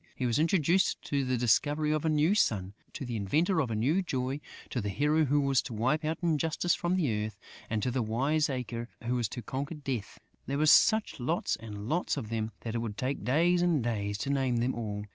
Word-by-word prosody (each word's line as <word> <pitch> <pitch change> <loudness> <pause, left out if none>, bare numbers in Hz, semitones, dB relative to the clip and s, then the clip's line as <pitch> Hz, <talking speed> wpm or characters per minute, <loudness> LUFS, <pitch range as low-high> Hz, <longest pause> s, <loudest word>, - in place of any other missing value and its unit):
He 130 - -2
was 120 +2 +1
introduced 170 +2 +2
to 140 -1 -1
the 130 -1 0
discoverer 145 +6 +2
of 155 - -1
a 160 - +1
new 155 +4 +3
sun, 100 - +1 0.2
to 135 - -5
the 120 -1 -4
inventor 155 - +1
of 130 - -2
a 110 - -2
new 140 - +2
joy, 135 -4 -2 0.3
to 125 - -1
the 105 - -3
hero 150 +10 +2
who 145 +2 +2
was 140 -2 +2
to 120 - -7
wipe 130 +8 +1
out 155 +1 -1
injustice 165 +1 +1
from 175 +1 0
the 120 - 0
earth 110 - -8 0.3
and 110 -1 -1
to 125 - 0
the 130 +1 0
wiseacre 125 0 -1
who 120 +1 -1
was 120 -4 0
to 120 - -6
conquer 140 +7 -4
Death.... 135 -8 -4 0.3
There 140 - -1
were 155 - +2
such 220 +6 +5
lots 160 +8 0
and 105 -2 -8
lots 170 +7 0
of 110 - -5
them 110 -1 -2
that 115 - -4
it 120 - -1
would 110 -3 -4
take 135 +2 -2
days 170 +7 +3
and 170 -7 +2
days 105 -3 -2
to 140 - -1
name 130 -3 +1
them 120 +3 +1
all. 105 -3 -4
130 Hz, 225 wpm, -30 LUFS, 115-155 Hz, 0.3 s, such